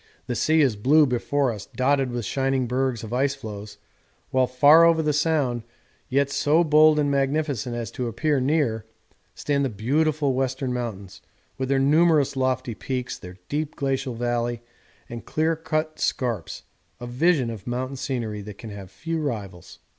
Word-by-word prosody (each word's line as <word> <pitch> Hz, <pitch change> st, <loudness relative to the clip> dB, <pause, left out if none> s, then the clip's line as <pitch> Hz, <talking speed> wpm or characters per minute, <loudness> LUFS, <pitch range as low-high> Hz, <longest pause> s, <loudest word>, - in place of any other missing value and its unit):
The 125 Hz, -, -3 dB
sea 155 Hz, +6 st, +2 dB
is 130 Hz, -7 st, +3 dB
blue 145 Hz, +9 st, +4 dB
before 130 Hz, +1 st, 0 dB
us, 105 Hz, -3 st, -8 dB
dotted 135 Hz, +2 st, +1 dB
with 120 Hz, -2 st, -3 dB
shining 135 Hz, +3 st, 0 dB
bergs 125 Hz, -1 st, -1 dB
or 110 Hz, +1 st, -7 dB
ice 135 Hz, +2 st, +1 dB
floes, 105 Hz, -4 st, -8 dB, 0.5 s
whilst 130 Hz, -1 st, 0 dB
far 150 Hz, +5 st, +8 dB
over 165 Hz, -1 st, +4 dB
the 150 Hz, -1 st, +1 dB
Sound, 145 Hz, -5 st, +1 dB, 0.5 s
yet 140 Hz, +1 st, +1 dB
so 155 Hz, +4 st, +3 dB
bold 155 Hz, 0 st, +5 dB
and 145 Hz, -1 st, +1 dB
magnificent 140 Hz, -3 st, -1 dB
as 115 Hz, -3 st, -4 dB
to 125 Hz, -, -3 dB
appear 145 Hz, +5 st, 0 dB
near, 130 Hz, -6 st, +1 dB, 0.5 s
stand 140 Hz, -1 st, 0 dB
the 135 Hz, -, 0 dB
beautiful 140 Hz, +6 st, 0 dB
Western 130 Hz, 0 st, -1 dB
Mountains 100 Hz, -6 st, -6 dB, 0.4 s
with 130 Hz, 0 st, -2 dB
their 135 Hz, -, +2 dB
numerous 150 Hz, +1 st, +3 dB
lofty 130 Hz, -2 st, -1 dB
peaks, 125 Hz, +3 st, -4 dB
their 90 Hz, -1 st, -11 dB
deep 150 Hz, +1 st, -3 dB
glacial 135 Hz, -2 st, -2 dB
valley 120 Hz, 0 st, -2 dB, 0.4 s
and 120 Hz, 0 st, -7 dB
clear 160 Hz, +1 st, 0 dB
cut 155 Hz, 0 st, -3 dB
scarps, 115 Hz, -10 st, -2 dB, 0.4 s
a 120 Hz, -, -6 dB
vision 130 Hz, 0 st, +1 dB
of 110 Hz, -2 st, -9 dB
mountain 130 Hz, +2 st, -3 dB
scenery 115 Hz, -6 st, -3 dB
that 100 Hz, 0 st, -9 dB
can 110 Hz, -1 st, -9 dB
have 100 Hz, -2 st, -9 dB
few 160 Hz, -, -4 dB
rivals. 100 Hz, -, -5 dB
130 Hz, 165 wpm, -24 LUFS, 120-145 Hz, 0.5 s, far